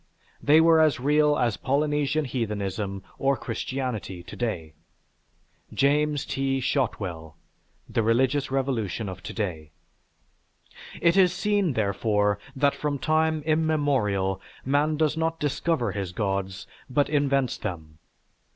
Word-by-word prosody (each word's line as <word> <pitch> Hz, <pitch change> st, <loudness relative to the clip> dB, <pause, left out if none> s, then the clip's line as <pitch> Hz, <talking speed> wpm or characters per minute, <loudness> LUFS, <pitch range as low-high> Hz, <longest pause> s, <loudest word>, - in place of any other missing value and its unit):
They 150 Hz, +2 st, +6 dB
were 165 Hz, 0 st, +6 dB
as 155 Hz, -5 st, +3 dB
real 150 Hz, +2 st, +3 dB
as 120 Hz, -4 st, +1 dB
Polynesian 145 Hz, +2 st, 0 dB
heathenism 100 Hz, -5 st, -3 dB, 0.2 s
or 135 Hz, 0 st, +2 dB
Christianity 120 Hz, -9 st, -4 dB
to -, -, -10 dB
day." 85 Hz, -10 st, -3 dB, 1.0 s
(James 145 Hz, +1 st, +2 dB
T. 135 Hz, 0 st, -1 dB
Shotwell: 90 Hz, -, -2 dB, 0.5 s
"The -, -, 0 dB
Religious 130 Hz, +5 st, +2 dB
Revolution 120 Hz, -7 st, -1 dB
of 95 Hz, -1 st, -7 dB
To 85 Hz, -, -7 dB
day.") 85 Hz, -8 st, -4 dB, 1.3 s
It 170 Hz, +2 st, +3 dB
is 185 Hz, -2 st, +6 dB
seen, 205 Hz, -5 st, +1 dB
therefore, 105 Hz, -1 st, +1 dB, 0.2 s
that 140 Hz, +1 st, +3 dB
from 145 Hz, -1 st, -2 dB
time 155 Hz, +1 st, +1 dB
immemorial, 140 Hz, -, +1 dB, 0.2 s
man 145 Hz, +3 st, +2 dB
does 155 Hz, -1 st, +2 dB
not 165 Hz, 0 st, -1 dB
discover 145 Hz, -4 st, 0 dB
his 95 Hz, -3 st, -4 dB
gods, 95 Hz, -1 st, -2 dB, 0.2 s
but 140 Hz, +3 st, +2 dB
invents 140 Hz, -3 st, +1 dB
them. 80 Hz, -6 st, -6 dB
130 Hz, 120 wpm, -26 LUFS, 100-150 Hz, 1.3 s, They